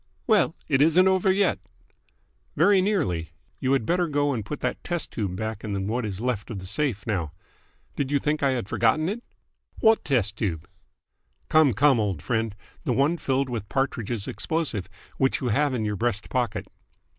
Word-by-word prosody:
"Well, 210 -8 +3
it 135 -2 +2
isn't 165 +5 +5
over 190 0 +3
yet." 190 - +2 1.0
"Very 190 +5 +5
nearly. 90 - -1 0.3
You 130 0 +1
had 135 -5 +1
better 175 +5 +1
go 145 -1 +1
and 115 -4 -3
put 145 +8 -6
that - - -2
test 175 -2 -2
tube 100 -5 -3
back 110 +2 -4
in 100 -3 -2
what 115 +2 -1
is 95 -2 -5
left 120 -3 -2
of 115 - -5
the 95 - -7
safe 105 +1 -1
now. 85 -9 -2 0.6
Did 140 -2 -1
you 145 - +2
think 150 +2 -1
I 140 - +3
had 120 -6 -3
forgotten 135 +10 +2
it?" 220 +6 -3 0.6
"What 220 0 +4
test 110 -7 0
tube?" 85 -9 -2 0.8
"Come, 155 -5 +5
come, 135 +3 +4
old 100 -8 -1
friend! 115 -3 -1 0.3
The 125 - 0
one 140 +7 +2
filled 135 -1 0
with 115 -5 -5
Partridge's 120 -6 -2
explosive, 110 - -2 0.3
which 135 0 +2
you 125 - -1
have 145 +6 +2
in 110 -3 -1
your 105 -1 -2
breast 110 -2 -1
pocket." 125 -4 -1
125 Hz, 180 wpm, -25 LUFS, 105-150 Hz, 1.0 s, isn't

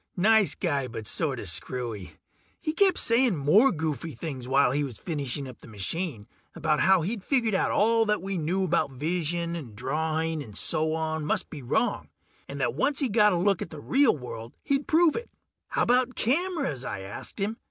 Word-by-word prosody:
Nice 215 +2 +4
guy, 145 -7 -1
but 110 -2 -7
sorta 135 -3 0
screwy. 100 0 -3 0.5
He 310 - -2
kept 385 +2 +4
saying 235 -2 +4
more 175 - +4
goofy 160 -1 -3
things 130 -2 -6
while 135 -1 +3
he 145 +2 0
was 130 -6 -5
finishing 140 -4 -4
up 125 - -11
the - - -15
machine, 115 - -4 0.3
about 155 -2 0
how 190 -3 +4
he'd 205 +3 -3
figured 235 -5 +1
out 190 - +2
that 225 0 +3
all - - -12
we 195 +1 -4
knew 180 +3 0
about 170 -5 +1
vision 170 +4 -2
and 130 -11 -8
drawing 155 +5 -1
and 110 -7 -9
so 155 0 +1
on 160 -1 -2
must 150 - -1
be 150 - -7
wrong, 120 - -1 0.4
and 140 - -7
that 120 -3 0
once 270 - 0
he 275 -4 +1
got 210 -1 +4
a 180 - +1
look 195 +1 +1
at - - -4
the 155 - -9
real 260 - +3
world 115 -3 -8
he'd 280 0 0
prove 325 -1 +4
it. 470 - -5 0.4
"How - - 0
about 250 +1 +2
cameras?" 280 - 0
I 100 - -5
asked 95 - -7
him. 210 +3 -2
160 Hz, 195 wpm, -27 LUFS, 135-210 Hz, 0.5 s, Nice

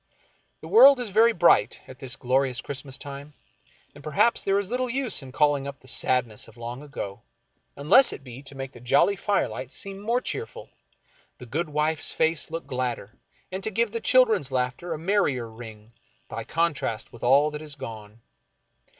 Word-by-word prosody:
The - - -9
world 280 - +8
is 245 -3 -3
very 225 +4 +5
bright 175 -5 +3
at 130 0 -12
this 130 -1 -4
glorious 130 -1 0
Christmas 135 -1 -5
time, 140 +1 -9 0.6
and 145 - -14
perhaps 155 +11 +2
there 195 0 +2
is 200 0 -2
little 255 +1 0
us^ 255 - -1
in 135 -1 -10
calling 145 0 +2
up 140 -1 -8
the 130 - -18
sadness 125 -3 +1
of 115 +1 -17
long 120 +3 -6
ago, 140 -9 -7 0.5
unless 240 - +5
it - - -8
be 125 0 -10
to 140 0 -10
make 135 -1 -6
the 120 - -14
jolly 135 +11 +3
firelight 185 - -2
seem 195 0 -4
more 230 +4 0
cheerful, 440 - -6 0.7
the 125 - -11
good 155 +7 -3
wife's 150 +1 -1
face 160 0 0
look 165 +1 -5
gladder, 125 -5 -3 0.4
and 190 +1 -5
to 220 - 0
give 220 +1 0
the 230 0 -4
children's 225 - +4
laughter 130 +7 -2
a 160 - -2
merrier 160 - 0
ring, 110 -1 -12 0.4
by - - -6
contrast 160 -9 -2
with 120 - -12
all 140 +5 +4
that 150 0 -6
is 150 -2 -8
gone. 110 -4 -9
145 Hz, 180 wpm, -25 LUFS, 125-195 Hz, 0.7 s, world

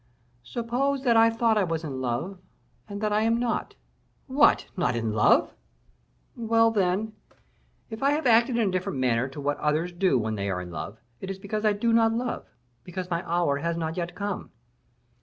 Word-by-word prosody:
"Suppose 245 - -2
that 240 -3 +3
I 225 0 +6
thought 225 -1 +2
I - - +3
was 165 -2 -2
in 135 -4 -5
love, 135 +10 -3 0.5
and 200 0 -6
that 210 -1 0
I 210 - +2
am 230 +1 +2
not." 240 -1 -2 0.5
"What! 285 +2 +4
not 150 -10 0
in 115 -2 -1
love!" 105 -1 +3 0.8
"Well, 230 -1 +3
then! 205 +1 0 0.8
if 220 - -6
I 275 - +3
have 295 +1 0
acted 235 0 +4
in 220 -4 +2
a - - -2
different 185 -2 -2
manner 125 -1 +1
to 135 +2 -9
what 145 +1 -1
others 155 +4 0
do 175 -5 +2
when 110 -2 -1
they 100 -1 -2
are 90 -2 -1
in 90 -1 -7
love, 100 +4 -6 0.2
it 190 - -7
is 195 - -4
because 210 +2 -4
I 210 - +4
do 230 +3 0
not 225 -1 +4
love; 240 +1 -3
and 120 0 -39
because 180 0 -6
my 170 +1 -1
hour 170 -5 +1
has 170 +3 -2
not 160 -1 -3
yet 175 -1 -4
come." 200 +1 -4
190 Hz, 200 wpm, -26 LUFS, 145-225 Hz, 0.8 s, I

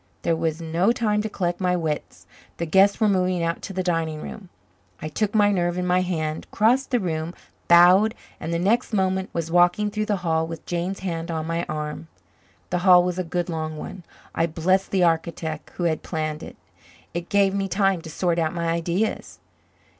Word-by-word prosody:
There 165 - +2
was 160 0 -1
no 170 +6 +1
time 210 -3 +1
to 220 - -3
collect 175 -2 -2
my 180 -1 +2
wits. 160 -4 -4 0.3
The 170 - -2
guests 195 +4 +4
were 220 - +3
moving 185 -3 +1
out 165 0 -1
to - - -6
the 185 -1 -2
dining 165 -3 -1
room. 190 +3 -9 0.5
I 155 - -5
took 210 +7 -1
my 205 -1 +5
nerve 175 -2 0
in 180 - -1
my 180 0 +3
hand, 160 -4 -3
crossed 245 +6 +2
the 245 - +2
room, 165 -3 -3 0.3
bowed, 180 +6 +6 0.2
and 165 - -4
the 170 - 0
next 220 +7 +1
moment 190 -1 0
was 165 -1 -3
walking 175 +4 +3
through 215 0 -2
the 210 - +1
hall 160 -1 +1
with 165 0 -8
Jane's 175 +3 -3
hand 170 -3 -4
on 160 -1 -2
my 165 +1 -2
arm. 150 +1 -4 0.6
The 180 - +1
hall 180 -1 +6
was 180 0 -2
a - - 0
good 175 +1 -2
long 155 -2 -4
one; 185 +4 -7 0.3
I 165 - +1
blessed 185 +4 +1
the 190 -2 +2
architect 165 -2 -1
who 175 - -3
had 165 -2 0
planned 155 -1 -3
it. - - -9 0.6
It 170 +1 -4
gave 200 -1 +3
me 195 0 -1
time 195 -2 +1
to 160 - -9
sort 170 +1 0
out 160 0 -1
my 170 -1 -1
ideas. 170 +5 -1
175 Hz, 200 wpm, -24 LUFS, 165-195 Hz, 0.6 s, bowed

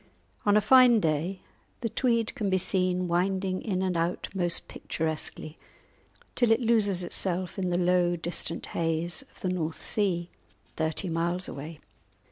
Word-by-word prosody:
On 205 0 +5
a - - +4
fine 250 -1 +6
day 165 +3 -1 0.4
the 230 - -1
Tweed 230 -2 0
can 205 -3 -2
be 190 - +2
seen 185 -1 +1
winding 185 +2 0
in 190 -3 -2
and 185 -2 -1
out 170 +1 -1
most 175 -3 +1
picturesquely, 155 0 -4 0.7
till 240 -2 +2
it 225 - +4
loses 215 -6 +3
itself 180 +1 -1
in 185 -1 -1
the 175 - 0
low 175 -1 +2
distant 170 +1 -3
haze 165 +3 0
of 270 - -21
the 185 - -1
North 165 -3 -3
Sea, 180 -5 0 0.4
thirty 160 +3 -2
miles 170 +2 -1
away. 150 +3 -8
180 Hz, 150 wpm, -27 LUFS, 170-200 Hz, 0.7 s, fine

